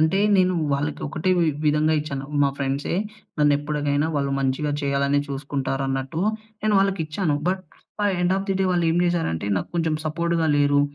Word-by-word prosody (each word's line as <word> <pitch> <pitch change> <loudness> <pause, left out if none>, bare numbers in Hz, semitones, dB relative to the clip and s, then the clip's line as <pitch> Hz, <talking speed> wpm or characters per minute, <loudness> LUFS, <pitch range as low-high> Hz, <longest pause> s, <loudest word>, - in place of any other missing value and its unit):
అంటే 160 +5 +3 0.2
నేను 185 -1 +3 0.2
వాళ్ళకి 145 +2 -1
ఒకటే 165 +5 -1
వి 170 - +3 0.2
విధంగా 155 +1 +3
ఇచ్చాను. 140 -2 -5 0.2
మా 140 - +4
ఫ్రెండ్సే 140 +3 -2 0.4
నన్నెప్పటికైనా 145 0 +1
వాళ్ళు 140 -1 0
మంచిగా 135 +3 0
చేయాలనే 140 0 +1
చూసుకుంటారు 135 -1 -2
అన్నట్టు 135 +4 -2 0.4
నేను 215 -1 +2
వాళ్ళకిచ్చాను. 185 -4 0
But 185 0 -1 0.6
end 180 +1 +2
of 195 - -2
the - - +2
day 190 - +2
వాళ్ళు 175 -1 +1
ఏం 165 - +1
చేసారంటే 165 - 0
నాకు 90 - -3
కొంచెం 165 -2 +1
సపోర్ట్‌గా 165 +1 0
లేరు. 145 0 +4
150 Hz, 160 wpm, -23 LUFS, 140-170 Hz, 0.6 s, మా